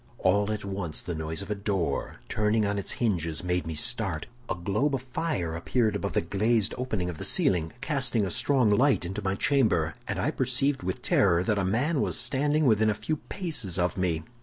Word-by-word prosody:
"All 100 +2 +2
at 110 -1 -4
once 95 -5 -3
the 85 - -4
noise 80 +3 -3
of 100 - -7
a - - +3
door, 100 -3 -2
turning 110 0 +1
on 100 0 -1
its 100 - -2
hinges, 85 -9 -1
made 90 -1 -1
me 80 - -4
start. 95 -3 +2 0.2
A - - 0
globe 105 +11 0
of 130 - -5
fire 125 - -2
appeared 110 +5 0
above 100 0 -3
the - - +2
glazed 105 +4 +1
opening 110 -8 -2
of 85 -3 -6
the - - -4
ceiling, 80 -3 +2
casting 130 -8 0
a 95 - -3
strong 130 +1 +2
light 130 -1 +3
into 95 +2 -4
my 95 0 -1
chamber; 110 - +2
and - - -2
I - - 0
perceived 135 +2 0
with 95 +1 -4
terror 90 -3 +3
that 105 +1 0
a - - 0
man 130 - +1
was - - +1
standing 145 +5 +1
within 110 -3 +4
a 105 - +1
few 155 +8 -2
paces 140 - -1
of 90 -1 0
me. 85 -4 -1
100 Hz, 210 wpm, -27 LUFS, 90-125 Hz, 0.2 s, within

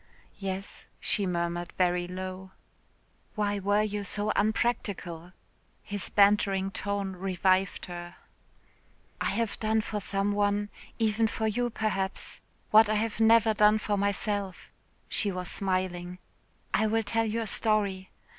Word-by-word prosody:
"Yes," 195 0 -5
she 200 -2 +1
murmured 170 0 -2
very 180 -1 +2
low. 185 +1 -6 0.8
"Why 205 -1 0
were 205 +2 +2
you 210 -1 -2
so 205 +1 0
unpractical?" 200 -6 -1 0.5
his 205 -1 -4
bantering 200 -1 +3
tone 200 -1 -2
revived 185 +1 +1
her. 175 -1 -8 1.1
"I - - +1
have 230 -2 -1
done 220 0 +1
for 210 0 -4
some 200 +1 0
one 205 0 +1 0.3
(even 225 0 +2
for 220 0 -2
you, 240 +3 0
perhaps) 200 -4 -2 0.3
what 220 0 +7
I 215 - +2
have 220 +1 -1
never 225 0 +5
done 210 0 +5
for 210 -1 -1
myself;" 200 -1 -1 0.4
she 205 - +1
was 180 -1 -4
smiling. 185 -2 -1 0.6
"I 220 - +3
will 225 +1 +1
tell 225 +2 +1
you 225 +2 -1
a - - -2
story. 200 -3 +1
205 Hz, 135 wpm, -28 LUFS, 185-215 Hz, 1.1 s, what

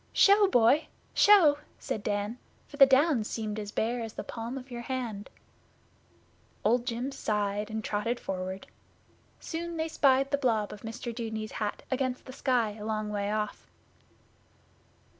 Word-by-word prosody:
'Show, 405 0 +6
boy! 255 -1 +4 0.3
Show!' 340 -9 +6 0.2
said 215 - -4
Dan, 205 +3 -2 0.3
for 285 - -12
the 275 -2 +9
Downs 265 -4 +3
seemed 215 -1 -3
as 205 -1 -6
bare 235 +3 -1
as 225 -1 -6
the - - -5
palm 235 +3 -5
of 255 0 -10
your 240 -1 -5
hand. 235 -5 -4 1.4
Old 240 +2 +2
Jim 245 +3 -2
sighed, 210 -3 -1
and 220 0 -4
trotted 220 +4 -1
forward. 190 0 -5 0.7
Soon 335 0 -5
they 320 0 -1
spied 275 -3 +3
the 285 - +1
blob 225 -6 +1
of 205 - -11
Mr 230 +1 -6
Dudeney's 220 -2 -4
hat 210 -1 -3
against 255 -1 -1
the 260 - -9
sky 250 -5 +1
a - - -7
long 215 -1 -2
way 205 0 -1
off. 215 0 -3
230 Hz, 155 wpm, -29 LUFS, 210-265 Hz, 1.4 s, the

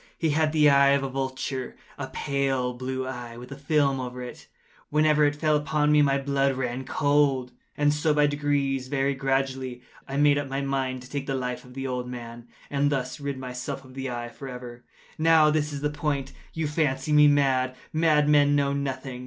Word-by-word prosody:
He 160 -2 +1
had 155 +1 +2
the 155 -1 +4
eye 140 -1 +6
of 140 -1 +1
a 135 - -2
vulture—a 130 -1 -5
pale 135 -3 -1
blue 130 +1 -4
eye, 120 -2 -7
with 125 +3 -11
a - - -5
film 140 -1 +1
over 125 0 -5
it. 125 - -10 0.4
Whenever 150 0 +3
it 145 0 +1
fell 155 0 +1
upon 150 0 +1
me, 150 0 +5
my 140 -1 +3
blood 140 -1 0
ran 130 0 -3
cold; 140 -3 +1 0.3
and 145 0 +3
so 150 +1 +1
by 150 0 +4
degrees—very 140 -1 0
gradually—I 135 -1 -3
made 145 0 +4
up 145 - -4
my 135 +1 -3
mind 135 -2 -2
to 125 - -13
take 140 -1 -4
the 135 - -1
life 125 -1 -3
of 125 0 -15
the 135 0 -4
old 125 -1 -3
man, 120 -1 -8 0.2
and 145 0 +2
thus 130 -2 -2
rid 140 -1 -4
myself 125 0 -6
of 130 - -14
the 135 0 -4
eye 120 -1 -4
forever. 125 -2 -9 0.4
Now 160 -1 +5
this 150 -1 0
is 140 -1 -5
the 150 0 0
point. 145 -2 -2 0.2
You 160 -1 -2
fancy 150 -2 0
me 150 0 +7
mad. 130 -3 +2 0.2
Madmen 150 -2 +4
know 140 -1 +1
nothing. 135 -2 -4
135 Hz, 190 wpm, -26 LUFS, 130-145 Hz, 0.4 s, me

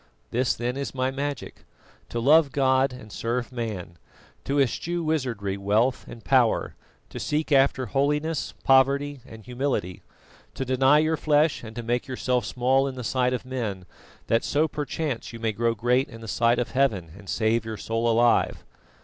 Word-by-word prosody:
"This 125 +1 +1
then 125 +2 -3
is 140 -1 -4
my 130 0 0
magic: 140 -1 -5 0.5
To 120 - -3
love 145 +4 +5
God 130 0 +2
and 125 -4 -11
serve 120 +4 -3
man; 105 -9 -5 0.5
to 140 +1 0
eschew 170 +6 0
wizardry, 125 -11 -1
wealth, 110 +6 +1
and 115 - -11
power; 125 -4 +2 0.4
to - - -7
seek 150 +1 -2
after 135 -1 +3
holiness, 150 +5 -1
poverty 140 +1 +3
and 110 -1 -12
humility; 125 -8 -2 0.5
to 135 - -3
deny 130 +3 +4
your 155 +1 +2
flesh, 150 -1 +2
and 110 -1 -9
to 120 - -5
make 120 +4 -1
yourself 125 -2 -1
small 130 +4 +1
in 135 - -5
the 125 - -6
sight 125 +1 +1
of 125 - -3
men, 110 -8 -4 0.4
that 115 +1 +1
so 155 +2 +1
perchance 145 -4 -4
you 115 - -8
may 115 -1 0
grow 115 +2 0
great 125 +4 +1
in 115 - -11
the 115 - -9
sight 120 +3 +2
of 120 - -2
Heaven 110 -12 0
and 100 -1 -13
save 110 0 +1
your 110 -1 -6
soul 115 +2 -1
alive." 115 +1 +2
125 Hz, 175 wpm, -25 LUFS, 115-140 Hz, 0.5 s, love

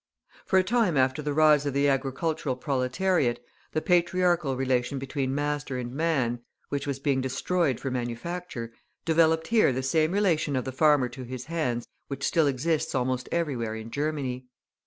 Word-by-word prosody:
For 190 - +3
a 185 - +5
time 210 - +2
after 130 +2 +2
the 150 0 -2
rise 150 -1 +4
of 140 - -2
the 140 +1 +3
agricultural 140 +1 -1
proletariat, 130 +1 0 0.3
the 155 - -1
patriarchal 175 -4 +2
relation 130 0 0
between 135 0 -2
master 145 -2 -2
and 125 -1 -5
man, 140 -6 0 0.3
which 140 0 -3
was 140 -2 -1
being 135 -1 0
destroyed 135 +2 0
for 135 - -3
manufacture, 120 +1 -4 0.3
developed 160 0 +3
here 225 -10 +4
the 130 +1 -2
same 155 +4 +2
relation 175 -8 +1
of 130 - -1
the 130 - -3
farmer 145 -1 +4
to 125 +2 -9
his 125 0 -7
hands 140 -8 -2 0.2
which 140 0 -4
still 160 -3 +3
exists 150 +3 0
almost 130 0 -1
everywhere 130 -10 -1
in 110 +1 -8
Germany. 140 -4 -3
140 Hz, 165 wpm, -27 LUFS, 130-160 Hz, 0.3 s, a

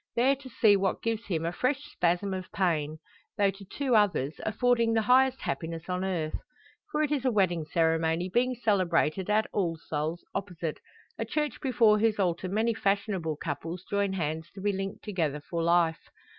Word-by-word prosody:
There 260 +4 +4
to 270 -1 -12
see 220 -3 +4
what 195 -1 0
gives 230 -1 -2
him 165 -4 -1
a 170 - 0
fresh 265 +8 0
spasm 180 +3 0
of 185 -1 -6
pain; 155 -5 0 0.4
though 200 -2 +3
to 195 +1 -13
two 255 +5 -1
others, 185 -9 +2
affording 230 +1 +2
the 220 - +2
highest 260 +3 +4
happiness 165 0 -4
on 180 0 -1
earth. 170 -5 -2 0.5
For 305 - +1
it 300 - -1
is 285 -4 0
a 260 - +3
wedding 180 -7 +1
ceremony 165 +2 +1
being 245 +6 +1
celebrated 185 -5 +1
at 215 +1 +3
"All 170 -5 0
Souls" 160 +1 -4
opposite, 175 -5 -4 0.4
a - - 0
church 300 -1 -2
before 230 -6 +4
whose 220 0 +2
altar 180 -1 0
many 220 +4 +1
fashionable 195 -6 0
couples 165 +4 -5
join 200 -1 +1
hands 160 -2 -3
to 195 - -8
be 205 +1 +1
linked 195 0 -4
together 165 -8 -1
for 165 +3 -4
life. 170 -1 +2
190 Hz, 180 wpm, -28 LUFS, 165-220 Hz, 0.5 s, There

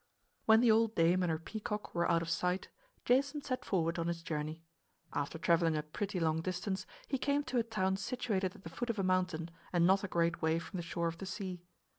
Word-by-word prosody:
When 220 +1 +7
the 240 -2 +6
old 225 0 +3
dame 170 +2 +4
and 180 - +1
her 160 - 0
peacock 210 +4 -5
were 170 0 +1
out 165 -1 +3
of 165 - -5
sight 180 +1 0 0.4
Jason 275 +4 +2
set 255 -1 -2
forward 170 -3 0
on 165 - -1
his 170 -1 -2
journey. 155 +1 -3 0.5
After 145 +3 -2
traveling 165 -1 +3
a 150 - -1
pretty 190 +5 -3
long 160 -1 +1
distance 185 +2 -3 0.2
he 270 - -1
came 285 +2 +1
to 255 -3 0
a - - +2
town 190 -4 0
situated 195 -3 -1
at - - -15
the 165 - -7
foot 235 +9 -4
of 230 - 0
a 195 - 0
mountain 180 -3 0 0.2
and 175 -1 +4
not 190 +2 +4
a - - -1
great 170 -2 +1
way 160 0 +2
from 170 +3 -5
the - - -2
shore 170 0 -1
of 165 0 -4
the 195 - -5
sea. 185 -2 -4
180 Hz, 230 wpm, -34 LUFS, 165-210 Hz, 0.5 s, When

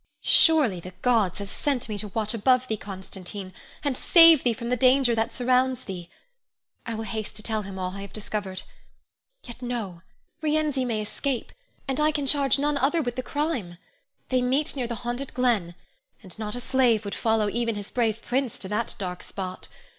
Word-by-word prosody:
Surely 295 - +5
the 180 +1 -10
gods 225 -7 +3
have 200 -1 -5
sent 270 +4 -1
me 215 - -4
to 210 +1 -3
watch 215 +2 -1
above 255 +3 +3
thee, 220 - 0
Constantine, 190 -1 -7 0.3
and 285 -3 0
save 330 0 +7
thee 245 - +3
from 235 +1 -5
the 250 - +2
danger 255 0 +4
that 225 +1 0
surrounds 255 0 +2
thee. 180 -3 -7 0.8
I 230 - -2
will 220 - -4
haste 220 -1 -5
to 210 - -5
tell 220 -1 -1
him 195 -1 -8
all 185 -1 -2
I 200 - -6
have 200 -1 -8
discovered. 205 -3 -4 0.8
Yet, 240 0 -11
no! 225 -8 -4 0.4
Rienzi 300 -4 +1
may 220 -3 -1
escape, 255 +3 -3 0.4
and 270 +1 -1
I 305 +1 +4
can 290 -2 -2
charge 275 0 +3
none 290 0 0
other 300 +5 +2
with 245 -2 -3
the 255 - -2
crime. 255 - -2 0.5
They 255 -1 +2
meet 265 +5 +1
near 255 -3 -2
the 235 - -3
haunted 245 +3 -4
glen, 225 -9 +1 0.5
and 190 +2 -11
not 210 0 -3
a 245 - -4
slave 245 -5 +2
would 200 - -4
follow 220 -2 +1
even 230 +1 -1
his 205 -1 -6
brave 225 -2 0
prince 255 -1 -1
to 190 - -5
that 210 +2 -1
dark 180 -2 -4
spot. 185 -2 -6
235 Hz, 190 wpm, -26 LUFS, 205-260 Hz, 0.8 s, save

